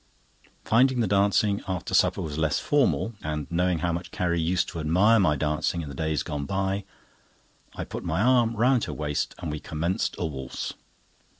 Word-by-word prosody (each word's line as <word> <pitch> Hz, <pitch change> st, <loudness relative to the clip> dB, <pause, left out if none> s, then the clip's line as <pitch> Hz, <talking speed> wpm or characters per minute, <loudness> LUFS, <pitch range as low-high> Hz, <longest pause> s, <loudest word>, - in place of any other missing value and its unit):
Finding 125 Hz, +3 st, +3 dB
the -, -, +2 dB
dancing 100 Hz, +1 st, +2 dB
after 95 Hz, -2 st, -3 dB
supper -, -, +3 dB
was 75 Hz, -2 st, -5 dB
less 80 Hz, -1 st, +1 dB
formal, 140 Hz, -5 st, +1 dB
and 75 Hz, -1 st, -3 dB
knowing 90 Hz, 0 st, +1 dB
how 85 Hz, -, +1 dB
much 85 Hz, +1 st, -4 dB
Carrie 85 Hz, -1 st, -1 dB
used 90 Hz, +3 st, +1 dB
to 85 Hz, -, -6 dB
admire 95 Hz, +9 st, +4 dB
my 75 Hz, -6 st, +3 dB
dancing 75 Hz, +3 st, -1 dB
in 75 Hz, -, -7 dB
the -, -, -7 dB
days 80 Hz, +2 st, -1 dB
gone 75 Hz, -3 st, -4 dB
by, 95 Hz, +1 st, -1 dB, 0.9 s
I -, -, -4 dB
put -, -, -7 dB
my 80 Hz, -, -1 dB
arm 120 Hz, 0 st, +3 dB
round 125 Hz, +2 st, +3 dB
her -, -, -5 dB
waist 75 Hz, -1 st, -2 dB
and 85 Hz, -4 st, -5 dB
we 75 Hz, -, -4 dB
commenced 85 Hz, +5 st, -2 dB
a -, -, -2 dB
waltz. 65 Hz, -4 st, -5 dB
85 Hz, 185 wpm, -26 LUFS, 75-100 Hz, 0.9 s, admire